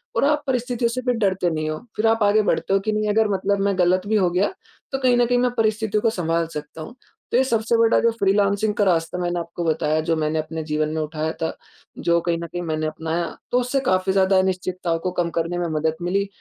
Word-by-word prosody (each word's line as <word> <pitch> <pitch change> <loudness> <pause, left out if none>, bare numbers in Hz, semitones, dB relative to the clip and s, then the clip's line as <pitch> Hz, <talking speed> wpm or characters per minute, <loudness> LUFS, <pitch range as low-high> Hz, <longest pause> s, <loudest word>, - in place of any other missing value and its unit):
और - - +2
आप 295 0 +2
परिस्थितियों 245 -2 0
से 255 +2 -3
भी 250 - +2
डरते 190 -3 +1
नहीं 155 0 -2
हो, 155 - -3 0.2
फिर 220 +1 +2
आप 225 -1 +3
आगे 205 +1 +4
बढ़ते 195 - 0
हो 195 - +4
कि 215 +2 -2
नहीं, 215 0 0
अगर 220 +1 +3
मतलब 195 +1 0
मैं 200 -2 +1
ग़लत 185 +2 +2
भी 215 - +1
हो 185 -3 +3
गया 185 +3 +1 0.4
तो 270 - -1
कहीं 250 -2 +3
न 245 - +4
कहीं 245 +1 +1
मैं 250 0 +2
परिस्थितियों 215 -1 +1
को 225 - +4
सँभाल 165 -4 -1
सकता 150 +1 -7
हूँ। 230 +10 -9 0.4
तो 240 - +3
ये 260 - +4
सबसे 230 -2 +1
बड़ा 230 0 +4
जो 230 - +3
फ्रीलांसिंग 200 +1 +2
का 205 - +2
रास्ता 170 -1 +1
मैंने 175 0 -1
आपको 170 +1 -5
बताया 155 -1 +1
जो 165 - +3
मैंने 155 0 0
अपने 160 +1 -4
जीवन 155 0 -1
में 160 - -1
उठाया 155 +1 -3
था, 160 - -2 0.4
जो 170 0 +2
कहीं 170 -1 0
न - - -5
कहीं 175 +2 -5
मैंने 155 -1 -2
अपनाया, 160 +2 -2 0.2
तो 250 - +3
उससे 250 +3 0
काफ़ी 185 +1 +2
ज़्यादा 190 0 +3
अनिश्चितताओं 185 -2 -1
को 185 - -2
कम 170 - -1
करने 170 +2 -2
में 175 -1 -1
मदद 160 +1 0
मिली 195 +3 0
190 Hz, 245 wpm, -22 LUFS, 165-220 Hz, 0.4 s, आगे